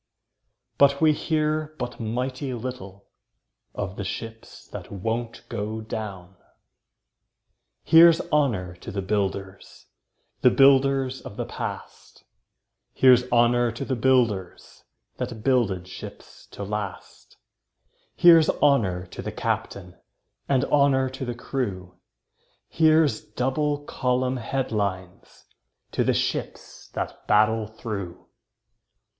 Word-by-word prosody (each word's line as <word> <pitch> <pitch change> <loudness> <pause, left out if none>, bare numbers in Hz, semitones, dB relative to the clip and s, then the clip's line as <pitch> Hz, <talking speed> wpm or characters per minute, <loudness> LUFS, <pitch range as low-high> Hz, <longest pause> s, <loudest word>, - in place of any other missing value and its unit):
But 140 0 +5
we 155 -1 +5
hear 155 0 -1
but 125 0 -5
mighty 125 +4 -3
little 110 -5 -8 0.7
Of 95 +2 -4
the 100 - -3
ships 110 +3 -8
that - - -9
won't 115 +4 -4
go 105 +2 -4
down. 100 -4 -7 1.5
Here's 165 0 +7
honour 110 - +1
to - - -10
the 100 0 -4
builders 100 -1 -3 0.3
– - - -47
The 125 - +6
builders 135 0 +3
of 100 - -10
the - - -2
past; - - -8 0.7
Here's 125 -1 +5
honour 120 0 +3
to 120 - -5
the 130 - -1
builders 115 -7 0 0.3
That 110 -2 -5
builded 105 -9 +1
ships 95 - -11
to - - -8
last; 100 -1 -7 0.8
Here's 165 -2 +7
honour 100 -11 +2
to 90 - -9
the - - -5
captain, 90 -2 -4 0.5
And 135 -1 +2
honour 140 -2 +3
to 130 0 -6
the 120 -1 -4
crew; 100 -9 -4 0.7
Here's 155 -6 +3
double 145 +6 -1
column 125 0 -1
headlines 100 -7 -4 0.5
To - - 0
the - - +1
ships - - -4
that - - -5
battle 110 +1 +3
through. 105 -5 -7
120 Hz, 110 wpm, -25 LUFS, 100-135 Hz, 1.5 s, Here's